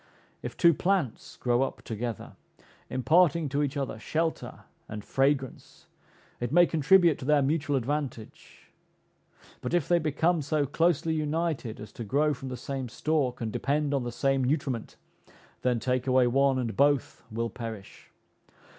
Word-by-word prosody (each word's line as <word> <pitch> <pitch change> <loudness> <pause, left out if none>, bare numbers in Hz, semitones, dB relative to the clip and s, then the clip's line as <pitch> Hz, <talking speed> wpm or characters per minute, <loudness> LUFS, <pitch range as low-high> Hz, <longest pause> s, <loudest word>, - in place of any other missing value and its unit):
If - - -7
two 170 -1 +6
plants 175 - -1
grow 120 0 +1
up 135 - -3
together, 115 0 -5 0.5
imparting 160 +3 +3
to 140 +2 0
each 145 0 -1
other 135 -5 -3
shelter 160 +7 -2 0.3
and 105 -2 -7
fragrance, 135 -1 -1 0.5
it 120 - -3
may 175 +3 +6
contribute 170 +1 +4
to - - -7
their 150 -1 +4
mutual 145 0 0
advantage; 130 -3 -5 0.9
but - - -1
if 170 -5 +1
they 175 -1 +4
become 160 +2 +1
so 145 0 0
closely 165 +2 +1
united 155 -6 -2
as 105 - -9
to 115 - -7
grow 145 +8 +1
from 135 0 -7
the 125 - -5
same 135 -2 -5
stalk, 135 -1 -1
and 110 -1 -2
depend 145 +4 0
on 140 - +1
the 120 - -4
same 135 +2 +1
nutriment, 130 -3 -2 0.7
then 125 -2 +1
take 125 +2 -1
away 130 -1 +4
one, 135 +2 +3
and 115 -5 -2
both 140 +1 +2
will 115 +1 -3
perish. 110 -5 -8
140 Hz, 155 wpm, -28 LUFS, 125-155 Hz, 0.9 s, two